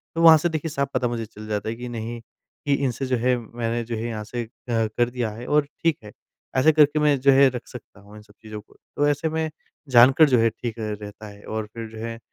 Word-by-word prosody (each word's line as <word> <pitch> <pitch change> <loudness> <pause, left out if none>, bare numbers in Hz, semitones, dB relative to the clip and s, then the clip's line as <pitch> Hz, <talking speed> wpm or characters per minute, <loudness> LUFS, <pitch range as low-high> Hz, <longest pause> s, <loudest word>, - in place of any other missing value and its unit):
तो 165 - 0
वहाँ 165 -1 +9
से 175 +3 0
देखिए 160 0 -3
साफ़ 140 -2 -2
पता 125 -1 +1
मुझे 120 -1 -3
चल 110 0 -12
जाता 105 0 -2
है 115 - -3
कि 125 +1 -7
नहीं 115 0 -5 0.5
कि 145 - +2
इनसे 130 +1 -2
जो 130 -1 0
है 125 +2 +2
मैंने 115 0 -3
जो 115 0 -5
है 110 +1 -4
यहाँ 110 -2 -4
से 120 +3 -4
अ, - - -11 0.2
कर 115 +1 0
दिया 120 -2 -2
है 115 +3 -9
और 150 0 +3 0.2
ठीक 165 -3 +2
है। 105 - -11 0.5
ऐसे 130 +5 +5
करके 150 -1 +4
मैं 150 -2 +3
जो 140 +1 +6
है 135 +1 +6
रख 125 -1 -7
सकता 120 -5 -12
हूँ 100 +1 -16
इन 105 - -11
सब 105 -1 -21
चीज़ों 110 -1 -8
को। - - -25 0.2
तो 145 - +2
ऐसे 145 +2 0
में 160 0 -2 0.4
जानकर 130 +5 +6
जो 125 -3 +4
है 115 0 +4
ठीक 115 0 -6
रहता 105 -1 -6
है। 100 0 -13
और 110 0 -4
फिर 115 -1 -6
जो 110 - -12
है 115 0 -6
120 Hz, 260 wpm, -23 LUFS, 110-140 Hz, 0.5 s, वहाँ